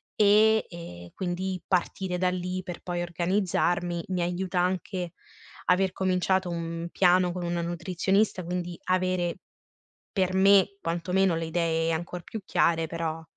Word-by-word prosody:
e 215 +1 +5
e 90 - -9
quindi 185 0 -3
partire 185 0 0
da 180 0 +2
lì 180 0 -3
per 175 -1 -7
poi 175 -1 -3
organizzarmi, 175 -1 0
mi 185 -1 -1
aiuta 180 +1 -1
anche 180 -1 -1 0.5
aver 185 +1 +3
cominciato 185 0 +1
un 170 0 -4
piano 180 -1 +4
con 180 0 -4
una 175 0 -1
nutrizionista, 185 +4 0
quindi 175 0 -4
avere, 185 -1 +1 0.8
per 185 -2 0
me 195 +1 +5
quantomeno, 175 +2 +1
le 165 0 -2
idee 165 0 0
ancor 170 +2 -4
più 220 -2 -7
chiare, 165 -3 +2
però 165 -1 -3
180 Hz, 135 wpm, -27 LUFS, 170-185 Hz, 0.8 s, e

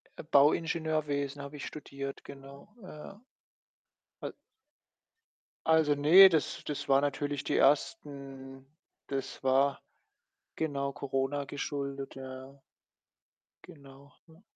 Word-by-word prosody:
Äh, - - -8
Bauingenieurwesen 150 -1 +1
habe 140 +1 -8
ich 145 - -6
studiert, 140 -2 -7
genau, 140 +7 -13
ja. 185 +3 -11 1.0
Al - - -5 1.3
also, 160 -2 +4
ne, 170 +7 +8
das 160 -4 -1
das 145 -1 -4
war 135 0 +5
natürlich 145 0 -2
die - - 0
ersten 135 -3 -1 0.4
das 135 -1 -5
war 135 +1 +2 0.8
genau, 140 -3 -2
Corona 135 +1 -2
geschuldet. 140 -1 -5
Ja, 135 - -9 0.2
ja. 135 +1 -18 1.0
Genau, 140 -1 -15
ne? 160 +3 -20
140 Hz, 105 wpm, -30 LUFS, 135-150 Hz, 1.3 s, ne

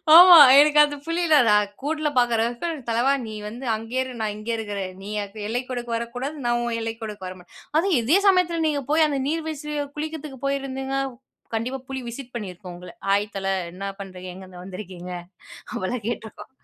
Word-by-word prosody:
ஆமா, 355 0 +11 0.2
எனக்கு 300 0 +6
அந்த 290 0 -5
புலி 335 +1 0
இல்ல, 310 -2 +6
நான் 210 -1 +3
கூண்டுல 305 +1 -1
பாக்குறக்கு, 235 +5 +1 0.2
தலைவா 240 +4 +3
நீ 220 - -7
வந்து 240 +5 -7
அங்கேயே 225 +4 -2
இரு, 255 - -7
நான் 210 -1 -2
இங்கே 215 +2 -4
இருக்குறேன். 200 -4 -4
நீ 205 - -7 0.4
எல்லைக்கோடுக்கு 245 0 -3
வரக்கூடா, 245 +4 -4 0.2
நான் 240 0 +2
உன் 235 -1 -1
எல்லைக்கோடுக்கு 220 -4 -5
வரமாட்டேன், 185 -1 -10 0.3
அதுவும் 345 -3 +3
இதே 285 +12 +4
சமயத்துல 360 -3 +3
நீங்க 290 -2 0
போய், 315 0 +5
அந்த 280 -2 -1
நீர் 320 +1 -1
வீழ்ச்சியை 300 -1 -3
குளிக்கிறதுக்கு 305 -3 -5
போயிருந்திங்க, 270 -1 -2 0.6
கண்டிப்பா 250 +4 -2
புலி 265 -1 -4
விசிட் 250 +1 -9
பண்ணியிருக்கும் 185 -4 -7
உங்கள, 180 0 -10 0.2
"ஹாய் 205 +1 +1
தல, 195 0 -3 0.3
என்ன 195 +2 -6
பண்ணுறீங்க? 185 -2 -8
எங்கிருந்து 185 -1 -11
வந்துருக்கீங்க?" 185 -1 -8 0.6
அப்படிலாம் 215 +3 -3
கேட்டுருக்கோம். 225 -2 -6
240 Hz, 165 wpm, -24 LUFS, 205-290 Hz, 0.6 s, ஆமா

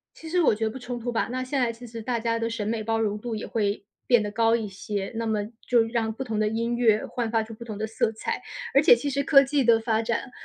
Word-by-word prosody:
其 325 - -10
实 360 +2 +1
我 280 - +4
觉 220 +1 -2
得 220 - 0
不 250 - -7
冲 245 -1 -5
突 240 +1 -4
吧， 225 - 0
那 255 +1 -2
现 265 +1 -1
在 235 -2 +1
其 240 +2 -11
实 230 0 -8
大 235 +1 -1
家 230 0 0
的 230 0 -2
审 225 -2 -3
美 220 0 -1
包 225 +1 0
容 210 -1 0
度 225 0 -4
也 215 - -5
会 205 -2 -1 0.2
变 240 -3 +5
得 210 - -3
高 225 +1 +3
一 225 -2 -3
些， 200 0 -5
那 230 0 -2
么 215 -2 0 0.2
就 240 -2 +4
让 225 -1 -1
不 265 +4 -5
同 220 -3 -3
的 215 - +2
音 230 +2 -1
乐 225 -3 +3
焕 235 -2 -3
发 225 0 +2
出 225 +1 -9
不 235 - -10
同 215 -3 -6
的 220 - -2
色 220 0 0
彩。 220 - -3 0.3
而 275 - +6
且 245 - +8
其 285 +4 -3
实 280 +1 0
科 275 0 +6
技 275 +1 +1
的 230 -1 +5
发 225 -1 0
展， 235 +2 -2
230 Hz, 315 characters per minute, -26 LUFS, 220-245 Hz, 0.3 s, 且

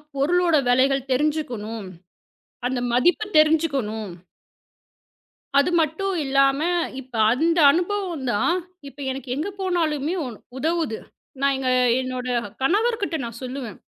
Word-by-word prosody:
பொருளோட 340 +4 +2
விலைகள் 270 +2 +2
தெரிஞ்சுக்கணும். 245 -7 -2 0.8
அந்த 255 0 -2
மதிப்பு 345 - +3
தெரிஞ்சுக்கணும். 280 - +2 1.5
அது 280 - +3
மட்டும் 330 +5 0
இல்லாம, 275 +1 +3 0.4
இப்ப 255 -2 -13 0.2
அந்த 330 +7 +2
அனுபவம் 355 -2 -2
தான் 275 +12 +1 0.3
இப்ப 275 +1 -13
எனக்கு 265 0 -7
எங்க 310 +8 -2
போனாலுமே 330 -4 0
உ - - -4 0.3
உதவுது. 315 -4 -1 0.4
நான் 275 0 +3
எங்க 265 -1 -1 0.3
என்னோட 255 -1 -4 0.3
கணவர்கிட்ட 405 - +1
நான் 235 0 -8
சொல்லுவேன். 255 -4 -6
280 Hz, 110 wpm, -23 LUFS, 255-335 Hz, 1.5 s, மதிப்பு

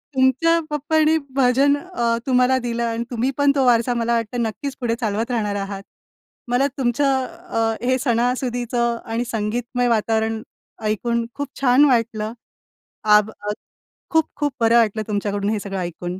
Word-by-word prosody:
तुमच्या 265 +6 +3
पप्पांनी 310 +2 +2 0.2
भजन 270 +2 +4
अ, 260 -9 -1
तुम्हाला 255 0 +3
दिलं 235 -1 -2
आणि 230 0 -1
तुम्ही 245 +2 0
पण 285 -1 +4
तो 270 -2 +2
वारसा 245 0 +3
मला 235 0 0
वाटतं 230 +1 -2
नक्कीच 265 +5 -4
पुढे 230 -2 0
चालवत 225 +1 -1
राहणार 210 -4 -1
आहात. 195 0 -4 0.6
मला 245 +3 +2
तुमचं 265 +1 +1
अ, 335 -10 -2
हे 255 +1 +2
सणासुदीचं 240 -1 0
आणि 230 +2 -2
संगीतमय 235 +2 -1
वातावरण 220 -1 +1 0.4
ऐकून 230 +2 0
खूप 285 0 -3
छान 265 +2 +5
वाटलं. 230 -4 +1 0.7
आभ 210 0 +5
अ, 210 -1 -5 0.6
खूप 320 -1 +3
खूप 290 -1 -1
बरं 230 0 +4
वाटलं 220 -2 +2
तुमच्याकडून 205 -1 -1
हे 215 -1 0
सगळं 195 -1 -5
ऐकून. 175 +1 -5
235 Hz, 150 wpm, -21 LUFS, 220-260 Hz, 0.7 s, छान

